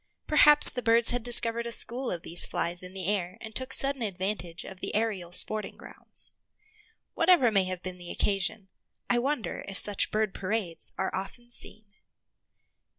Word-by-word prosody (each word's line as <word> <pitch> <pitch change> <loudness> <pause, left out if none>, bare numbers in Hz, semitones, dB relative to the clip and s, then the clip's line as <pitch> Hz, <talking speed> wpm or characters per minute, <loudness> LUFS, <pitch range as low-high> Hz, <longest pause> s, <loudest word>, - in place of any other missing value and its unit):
Perhaps 295 0 +5
the 250 - -5
birds 230 0 +4
had 245 0 -2
discovered 235 0 +3
a - - -6
school 245 +3 +2
of 170 -2 -5
these 170 - +2
flies 170 +1 -1
in 180 +1 -7
the 190 -2 -5
air 185 -2 -3
and 220 - -10
took 260 +3 -3
sudden 275 -1 +2
advantage 190 -4 -5
of 190 - -11
the - - -6
aerial 205 -6 -2
sporting 215 +4 +1
grounds. - - +1 0.8
Whatever 330 -9 +3
may 195 -3 +2
have 185 -1 -6
been 185 -1 -7
the 175 -1 -10
occasion, 195 0 -2 0.4
I 240 - +2
wonder 270 -2 -4
if 195 0 -5
such 205 -2 +3
bird 215 -2 -2
parades 190 -3 -2
are 190 - -3
often 240 +6 -7
seen. 215 -2 -2
210 Hz, 170 wpm, -27 LUFS, 185-240 Hz, 0.8 s, Perhaps